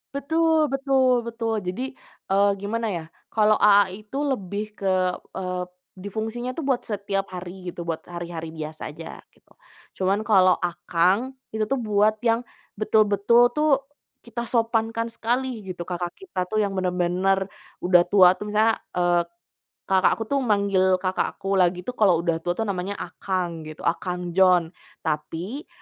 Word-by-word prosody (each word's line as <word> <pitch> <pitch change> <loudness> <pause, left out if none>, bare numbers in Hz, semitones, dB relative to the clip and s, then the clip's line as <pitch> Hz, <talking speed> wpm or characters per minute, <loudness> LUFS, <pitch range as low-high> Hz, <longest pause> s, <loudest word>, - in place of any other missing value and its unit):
Betul 320 +2 +2
betul 265 -2 +2
betul 230 -1 -2
jadi, 250 +9 -4 0.3
eee, 200 +1 +4
gimana 225 +3 -2
ya, 170 -3 -3 0.3
kalau 215 -1 +4
"aa" 205 -1 +6
itu 210 +8 -7
lebih 210 -4 -3
ke, 185 -2 +1 0.2
eee, 180 -1 -3 0.3
di 185 +2 -8
fungsinya 225 +4 -3
tuh 280 +2 -5
buat 260 -3 +1
setiap 200 -2 -3
hari 180 0 -7
gitu, 170 0 -8
buat 165 -1 -3
hari-hari 170 -2 -6
biasa 155 -1 -6
aja 165 +2 -10
gitu, - - -31 0.4
cuman 195 +2 +1
kalau 185 -4 +5
"akang" 175 +6 +1 0.2
itu 220 - +1
tuh 260 +5 -1
buat 215 -1 +2
yang, 230 +1 +2 0.3
betul-betul 215 +2 +3
tuh, 305 +1 +2 0.5
kita 235 0 -5
sopankan 230 -1 0
sekali 240 0 -2
gitu 185 -2 -7
kakak 175 -1 -3
kita 360 - -4
tuh 215 +4 -1
yang 200 -2 -1
bener-bener 185 +1 +1 0.3
udah 180 -1 +5
tua 185 -2 +7
tuh, 210 +1 -6
misalnya, 220 +1 +2
eee, 175 -1 +2 0.6
kakak 190 -1 +3
aku 225 - -4
tuh 280 - +3
manggil 200 -5 +2
kakak 185 0 -2
aku 195 0 0
lagi 180 0 +2
tuh 250 - -4
kalau 205 -7 +4
udah 165 -2 0
tua 175 +1 -2
tuh 225 - -1
namanya 200 -1 -3
"akang" 175 -6 -4
gitu 155 - -10
akang 180 +1 -2
John, 180 -2 +4 0.3
tapi 180 - -4
200 Hz, 155 wpm, -24 LUFS, 180-225 Hz, 0.6 s, tua